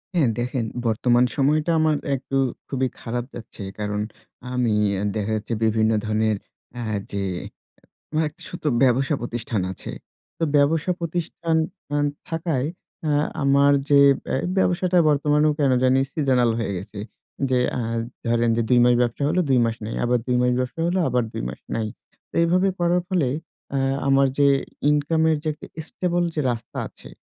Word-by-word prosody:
হ্যাঁ, 150 -8 +4
দেখেন 120 0 -1 0.2
বর্তমান 120 +2 +3
সময়টা 150 +4 +2
আমার 155 -1 +3 0.2
একটু 135 +1 -3 0.3
খুবই 130 -1 0
খারাপ 120 +1 -3
যাচ্ছে। 115 -3 -9 0.2
কারণ, 105 0 -2 0.5
আমি 125 -3 +1 0.3
এ - - -2
দেখা 105 0 -1
যাচ্ছে 110 +2 -3
বিভিন্ন 110 0 +3
ধরনের 110 0 +1 0.4
আ - - -3 0.3
যে 100 - -2 0.2
এ - - -7 0.6
আমার 155 +1 +1
একটা 150 - -22
ছোট্ট 175 - -9 0.2
ব্যবসা 135 +3 +3
প্রতিষ্ঠান 120 -3 -3
আছে। 95 - -8 0.5
তো - - -2
ব্যবসা 155 +5 +2
প্রতিষ্ঠান 170 0 -2 0.4
আন 145 0 +2 0.2
থাকায় 160 -5 -1 0.4
অ্যা 150 -2 +2 0.3
আমার 140 +1 +5 0.2
যে 145 -1 +6 0.3
বে - - -2 0.2
ব্যবসাটা 180 -1 +2
বর্তমানেও 150 +1 +3
কেন 140 -3 +3
জানি 130 +1 +4
seasonal 130 -6 +2
হয়ে 115 - -1
গেছে। 100 +3 -8 0.5
যে 130 -1 +3 0.2
আ - - -1 0.5
ধরেন 120 0 +2
যে, - - +3
২ 125 - +5
মাস 125 0 +5
ব্যবসা 120 +3 0
হলো, 175 +4 +1
২ 130 -2 +4
মাস 115 -1 -1
নাই। 110 - -4
আবার 120 0 +2
২ 125 - +2
মাস 125 0 +3
ব্যবসা 130 +5 -3
হলো, 180 +2 +1
আবার 125 -1 +1
২ - - -4
মাস - - -9
নাই। 110 -1 -1 0.4
তো - - -66
এইভাবে 180 +3 +3
করার 175 +1 +2
ফলে 180 -8 +2 0.5
আ - - +2 0.3
আমার 135 0 +5
যে 145 -1 +5 0.4
ইনকামের 160 +2 +2
যে - - -3
একটা 150 - -12 0.2
stable 175 -1 0
যে - - 0
রাস্তা 115 -2 -7
আছে, - - -15
135 Hz, 165 wpm, -23 LUFS, 120-155 Hz, 0.6 s, যে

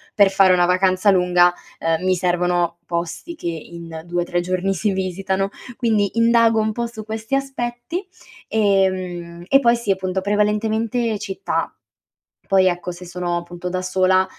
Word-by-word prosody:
per 200 -2 +6
fare 190 -1 +5
una 175 -1 +4
vacanza 185 +2 +3
lunga, 180 -1 +4 0.3
ehm, 165 +1 0
mi 185 - +3
servono 175 -1 0
posti 170 - -4
che 175 - -6
in 165 0 -8
2-3 175 0 -1
giorni 185 +2 -1
si 205 +4 0
visitano. 190 +1 -1 0.3
Quindi 220 -3 +1
indago 230 -1 +4
un 215 - 0
po' 235 +1 -2
su 220 -2 -9
questi 220 +3 -6
aspetti, 270 +6 -3 0.4
ehm, 185 -5 0
e 275 - +5
poi 235 -3 +4
si 235 -3 -6
appunto, 190 0 -1
prevalentemente 215 +3 0
città. 195 -1 -3 0.7
Poi 190 -1 +4
ecco 175 0 -1
se 175 +1 -10
sono 175 0 -3
appunto 175 +1 -6
da 185 0 -2
sola 185 0 +2
190 Hz, 150 wpm, -21 LUFS, 175-220 Hz, 0.7 s, per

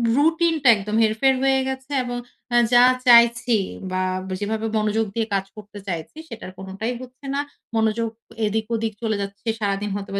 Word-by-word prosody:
রুটিনটা 320 -1 +2
একদম 210 +2 -4
হেরফের 225 +5 +3
হয়ে 270 0 +3
গেছে 265 +1 -5
এবং 245 0 -4 0.4
এ - - +6 0.2
যা 245 0 +8 0.2
চাইছি 235 -1 +6 0.3
বা 185 0 0 0.3
ব - - -8
যেভাবে 220 +2 -2
মনোযোগ 215 +1 +1
দিয়ে 225 -1 0
কাজ 195 0 0
করতে 205 0 -10
চাইছি 170 - -5
সেটার 220 -5 -8
কোনটাই 195 +5 -4
হচ্ছে 255 +2 -12
না। 285 - +1 0.3
মনোযোগ 225 +1 +1 0.4
এদিক 220 +1 -1
ওদিক 225 -1 -2
চলে 220 -1 0
যাচ্ছে। 200 +3 -7
সারাদিন 200 0 -1
হয়তোবা 200 0 -4
220 Hz, 165 wpm, -22 LUFS, 205-245 Hz, 0.4 s, যা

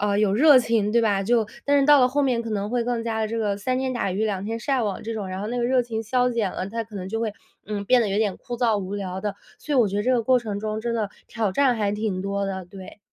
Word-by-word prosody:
呃， 205 0 +1
有 205 -2 +2
热 285 +2 +7
情， 230 -3 +1
对 235 - +3
吧？ 205 -3 +1
就 225 +1 +2 0.2
但 285 0 +3
是 275 - +3
到 290 -1 +7
了 250 - +5
后 285 +3 0
面 250 -4 +1
可 230 - -6
能 205 -1 -2
会 240 +1 0
更 235 -1 -2
加 220 -1 -2
地 215 - 0
这 230 +1 -3
个， 205 -2 0
三 255 +5 -1
天 260 -1 -1
打 235 -6 -1
鱼 205 +4 -1
两 200 -2 -2
天 225 +2 -3
晒 265 0 0
网 205 -3 -2
这 225 0 -4
种， 200 -3 -4
然 185 +1 -5
后 210 - -3
那 245 +2 -3
个 240 - 0
热 255 +1 +3
情 225 -2 -4
消 250 +3 +1
减 230 -5 -1
了， 185 - -4
它 230 +2 -3
可 215 -2 -11
能 185 0 -5
就 225 +2 -3
会， 220 -2 -1 0.3
嗯， 205 -1 -4
变 250 +3 +4
得 210 - -1
有 195 - 0
点 210 -4 0
枯 240 -1 -7
燥 230 -3 +2
无 195 0 -4
聊 190 -1 -4
的。 205 -1 -3 0.2
所 300 - -5
以 270 - +3
我 230 - +5
觉 200 - -3
得 205 - +1
这 255 - +2
个 240 - +3
过 255 +1 +4
程 210 -3 -4
中 215 +1 -3
真 235 +1 -2
的， 215 -3 -1 0.2
挑 220 -5 -1
战 260 +1 +3
还 205 -2 0
挺 210 -3 -2
多 200 +1 -2
的， 190 -2 -4
对。 190 0 -11
220 Hz, 340 characters per minute, -24 LUFS, 200-240 Hz, 0.3 s, 热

